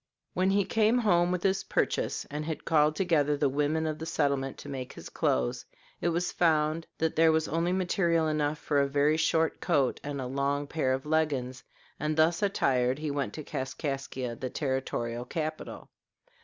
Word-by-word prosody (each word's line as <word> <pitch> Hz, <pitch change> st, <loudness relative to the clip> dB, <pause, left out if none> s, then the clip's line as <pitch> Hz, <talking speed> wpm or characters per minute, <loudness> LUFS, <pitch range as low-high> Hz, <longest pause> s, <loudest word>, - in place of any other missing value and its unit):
When 185 Hz, +1 st, +2 dB
he 200 Hz, 0 st, +2 dB
came 220 Hz, +4 st, +3 dB
home 180 Hz, -7 st, +3 dB
with 180 Hz, -1 st, -2 dB
his 195 Hz, 0 st, +1 dB
purchase -, -, -1 dB
and 150 Hz, +1 st, -3 dB
had 155 Hz, -1 st, -5 dB
called 150 Hz, -1 st, +3 dB
together 150 Hz, -6 st, +2 dB
the 145 Hz, -, +2 dB
women 150 Hz, +3 st, 0 dB
of 155 Hz, -1 st, -3 dB
the 160 Hz, -, -5 dB
settlement 140 Hz, -4 st, 0 dB
to -, -, -10 dB
make 130 Hz, -2 st, -6 dB
his -, -, -10 dB
clothes, 60 Hz, -1 st, 0 dB, 0.4 s
it 175 Hz, -, +1 dB
was 170 Hz, +1 st, -1 dB
found 160 Hz, -1 st, +1 dB
that 160 Hz, 0 st, 0 dB
there 160 Hz, 0 st, +5 dB
was 160 Hz, 0 st, +1 dB
only 165 Hz, +2 st, 0 dB
material 175 Hz, -3 st, +1 dB
enough 150 Hz, -1 st, 0 dB
for 145 Hz, -2 st, +1 dB
a 140 Hz, -, +2 dB
very 145 Hz, +2 st, +2 dB
short 160 Hz, 0 st, +1 dB
coat 145 Hz, -7 st, +1 dB
and 145 Hz, -1 st, -4 dB
a 130 Hz, -, -3 dB
long 140 Hz, +2 st, -1 dB
pair 140 Hz, -3 st, -1 dB
of 130 Hz, +1 st, -3 dB
leggins, 145 Hz, -5 st, -1 dB, 0.4 s
and 150 Hz, +1 st, -1 dB
thus 165 Hz, +4 st, +3 dB
attired 130 Hz, -10 st, +1 dB
he 155 Hz, -1 st, -3 dB
went 140 Hz, -1 st, -2 dB
to 155 Hz, -, -6 dB
Kaskaskia, 130 Hz, -2 st, -4 dB
the 130 Hz, -, -4 dB
territorial 125 Hz, -4 st, -2 dB
capital. 155 Hz, +3 st, -5 dB
155 Hz, 185 wpm, -29 LUFS, 140-165 Hz, 0.4 s, there